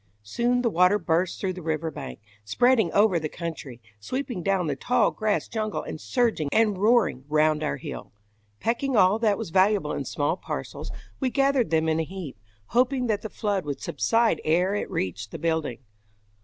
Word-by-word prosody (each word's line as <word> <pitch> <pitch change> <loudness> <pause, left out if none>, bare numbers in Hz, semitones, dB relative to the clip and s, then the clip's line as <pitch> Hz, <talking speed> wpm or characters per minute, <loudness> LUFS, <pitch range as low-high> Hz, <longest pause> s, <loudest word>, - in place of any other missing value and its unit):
Soon 240 - 0
the 235 - +3
water 180 +3 +4
burst 175 -1 0
through 190 -2 -1
the 180 - -8
river 160 0 -2
bank, 65 - -8 0.2
spreading 220 - +3
over 205 -4 +4
the 155 -1 -4
country, 155 -8 -7 0.2
sweeping 255 - -4
down 190 0 +1
the 145 -3 -1
tall 240 - +2
grass 215 -2 -1
jungle 215 -2 -3
and 155 - -7
surging 230 - 0
and 215 -4 +2
roaring 215 - +3
round 155 0 +3
our 150 -2 -1
hill. - - -8 0.5
Packing 240 +2 0
all 195 +2 +5
that 215 -3 +2
was - - -6
valuable 195 +3 +3
in - - -3
small - - -1
parcels, - - -6 0.3
we 265 - +1
gathered 275 - +2
them 160 0 +2
in 160 0 +1
a - - +1
heap, 165 - -8 0.3
hoping 250 +1 +2
that 215 -3 0
the 220 - -6
flood 205 -4 -1
would 145 -2 -4
subside 230 -7 +1
ere 180 +5 +2
it 205 - -2
reached 95 +3 -3
the - - -7
building. 160 -6 -1
190 Hz, 185 wpm, -25 LUFS, 160-225 Hz, 0.5 s, all